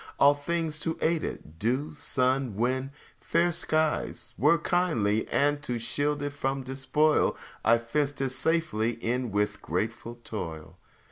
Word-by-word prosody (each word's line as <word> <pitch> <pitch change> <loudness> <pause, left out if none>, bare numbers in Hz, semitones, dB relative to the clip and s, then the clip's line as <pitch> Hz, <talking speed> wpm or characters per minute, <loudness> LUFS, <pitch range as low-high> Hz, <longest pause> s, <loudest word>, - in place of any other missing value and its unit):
All 140 +1 +7
things 155 +1 -2
to 160 +1 -1
aid 165 0 +1
it 80 +1 -7
dew, 130 - 0
sun, 130 -4 0
wind, 130 +4 0 0.3
fair 175 +1 +2
skies 155 -1 0
Were 150 - +4
kindly; 150 - +1
and 145 +1 +1
to 125 -5 -2
shield 145 +5 0
it 145 - -2
from 135 -1 -2
despoil, 135 +4 +2 0.3
I 115 +1 +5
fenced 140 +5 -1
it 135 -1 0
safely 130 -5 0
in 120 +1 -2
with 105 +1 0
grateful 115 +1 -3
toil. 80 -9 -6
135 Hz, 140 wpm, -28 LUFS, 115-150 Hz, 0.3 s, All